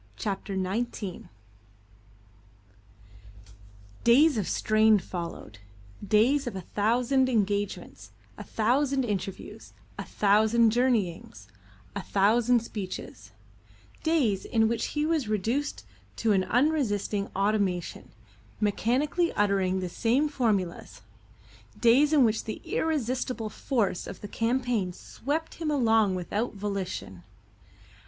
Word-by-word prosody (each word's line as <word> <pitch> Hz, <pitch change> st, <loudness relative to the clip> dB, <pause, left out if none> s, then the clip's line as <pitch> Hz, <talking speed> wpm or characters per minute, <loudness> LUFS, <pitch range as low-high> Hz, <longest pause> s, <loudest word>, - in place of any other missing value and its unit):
CHAPTER 200 Hz, -1 st, -4 dB
XIX 195 Hz, 0 st, -3 dB, 2.8 s
DAYS 280 Hz, +6 st, +5 dB
of 195 Hz, -, -2 dB
strain 215 Hz, 0 st, +3 dB
followed: 170 Hz, -, -7 dB, 0.4 s
days 235 Hz, +8 st, +3 dB
of 235 Hz, -, -4 dB
a 190 Hz, -, -4 dB
thousand 245 Hz, +8 st, +1 dB
engagements, 205 Hz, -3 st, -2 dB, 0.3 s
a -, -, -8 dB
thousand 265 Hz, +4 st, +1 dB
interviews, 195 Hz, -3 st, -5 dB, 0.3 s
a -, -, -2 dB
thousand 220 Hz, +3 st, +3 dB
journeyings, 205 Hz, -, -1 dB, 0.5 s
a -, -, -2 dB
thousand 230 Hz, +4 st, +2 dB
speeches; 200 Hz, -5 st, -7 dB, 0.7 s
days 275 Hz, -, +1 dB
in 225 Hz, -1 st, +2 dB
which 230 Hz, 0 st, -1 dB
he 295 Hz, -, +2 dB
was 315 Hz, -6 st, 0 dB
reduced 230 Hz, +8 st, -2 dB, 0.3 s
to 225 Hz, -, 0 dB
an 190 Hz, -2 st, +2 dB
unresisting 225 Hz, -5 st, 0 dB
automaton, 195 Hz, -3 st, -1 dB, 0.5 s
mechanically 255 Hz, -, +1 dB
uttering 195 Hz, -2 st, +1 dB
the 180 Hz, -, -2 dB
same 240 Hz, -, +1 dB
formulas; 215 Hz, -, -2 dB, 0.8 s
days 260 Hz, +6 st, +5 dB
in 290 Hz, -5 st, +5 dB
which 220 Hz, -1 st, 0 dB
the 215 Hz, -, -5 dB
irresistible 255 Hz, -6 st, -2 dB
force 215 Hz, -9 st, -1 dB
of -, -, -9 dB
the 205 Hz, -, -6 dB
campaign 230 Hz, -3 st, -1 dB
swept 310 Hz, -, -5 dB
him 315 Hz, -, -1 dB
along 225 Hz, -8 st, +3 dB
without 205 Hz, +6 st, -3 dB
volition. 195 Hz, -, -5 dB
220 Hz, 105 wpm, -27 LUFS, 200-255 Hz, 2.8 s, DAYS